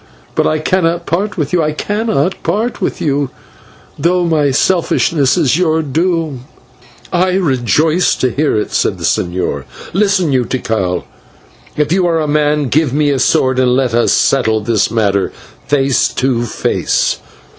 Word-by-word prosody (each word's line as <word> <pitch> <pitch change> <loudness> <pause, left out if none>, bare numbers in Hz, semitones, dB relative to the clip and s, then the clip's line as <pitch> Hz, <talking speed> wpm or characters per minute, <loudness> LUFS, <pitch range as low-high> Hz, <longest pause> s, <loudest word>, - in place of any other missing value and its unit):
But - - +1
I 155 - +1
cannot 170 +1 0
part 195 +5 -2
with 150 -2 -2
you 175 - +3
I 155 -1 0
cannot 195 -3 -1
part 230 +4 -2
with - - -2
you 145 -2 0 0.7
though 175 +3 +1
my 155 -4 +2
selfishness 160 -1 +1
is 155 -1 +2
your 160 -3 +1
doom." 160 -3 -1 0.7
"I 180 +1 +2
rejoice 155 +1 +1
to 130 - 0
hear 145 -1 0
it," - - -4
said - - 0
the - - -9
señor. 85 -6 -1 0.3
"Listen 195 -4 +2
you, 130 -2 +2
Tikal, 110 -8 -2 0.7
if 150 0 0
you 180 0 +2
are 165 -1 +1
a 155 - -1
man, 150 -1 +1
give 155 0 +1
me 145 0 +2
a 135 - 0
sword 130 0 +2
and 125 -1 +3
let 130 -3 0
us 120 0 +2
settle 110 -5 +2
this 110 -1 +1
matter 100 -4 0 0.4
face 135 -2 +2
to 125 -2 -1
face. 115 - -1
150 Hz, 155 wpm, -14 LUFS, 130-170 Hz, 0.7 s, you